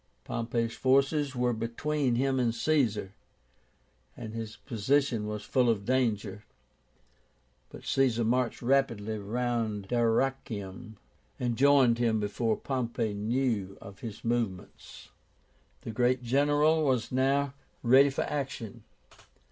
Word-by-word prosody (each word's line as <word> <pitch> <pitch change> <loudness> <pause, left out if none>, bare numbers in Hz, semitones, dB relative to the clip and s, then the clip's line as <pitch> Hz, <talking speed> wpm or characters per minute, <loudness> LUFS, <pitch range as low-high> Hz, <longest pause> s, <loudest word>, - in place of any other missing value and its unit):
Pompey's 115 - -2
forces 140 +2 +2
were 125 0 +1
between 125 +4 -1
him 135 +1 +1
and 120 -2 +1
Caesar, 115 -8 +1 1.1
and 110 - -7
his 115 -1 -6
position 120 -1 0
was 105 0 -4
full 125 -2 +2
of 100 -3 0
danger; 110 -5 0 1.3
but - - -12
Caesar 125 -4 +2
marched 120 +1 0
rapidly 115 -5 +1
round 110 -2 -2
Dyrrachium, 115 -3 -1 0.4
and 120 -2 -1
joined 135 -3 +4
him 115 -2 +2
before 110 +2 -1
Pompey 120 -4 -2
knew 105 -2 -1
of 100 -1 -12
his 110 -2 -8
movements. 115 -6 -4 0.7
The - - -6
great 125 +2 +1
general 145 +5 +3
was 130 -5 0
now 135 +1 +1 0.3
ready 135 +4 +6
for 135 - -2
action. 135 -7 -5
120 Hz, 115 wpm, -29 LUFS, 110-135 Hz, 1.3 s, ready